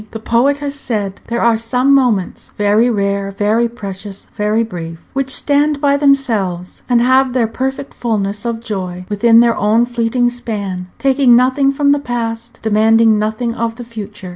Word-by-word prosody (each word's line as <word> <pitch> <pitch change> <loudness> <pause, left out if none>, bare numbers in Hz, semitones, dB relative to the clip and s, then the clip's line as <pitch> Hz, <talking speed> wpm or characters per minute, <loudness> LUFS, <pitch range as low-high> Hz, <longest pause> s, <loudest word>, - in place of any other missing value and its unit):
The 225 - -7
poet 245 +6 +1
has 285 -1 -4
said, 210 -8 -3
there 235 0 -2
are 235 -1 +4
some 250 +4 +1
moments 240 -9 0
very 210 +4 +3
rare, 200 -2 -1
very 215 +4 0
precious, 200 -3 -8
very 210 +2 0
brief 165 -6 -8
which 270 0 -2
stand 290 +2 +1
by 280 -1 +2
themselves, 230 -11 0
and 240 -1 +3
have 260 0 +3
their 250 -3 +2
perfect 265 +4 -4
fulness 205 -3 -2
of 230 -1 -3
joy 185 -5 -5
within 230 +3 +4
their 235 -1 +3
own 220 +3 +2
fleeting 240 0 0
span, 200 -7 -5
taking 270 -2 +4
nothing 260 +3 +3
from 280 +1 +1
the 285 - +2
past, 235 -3 -4
demanding 220 0 +3
nothing 220 +2 -2
of 230 -1 -3
the 245 - -8
future. 210 -4 -8
230 Hz, 165 wpm, -16 LUFS, 210-255 Hz, -, are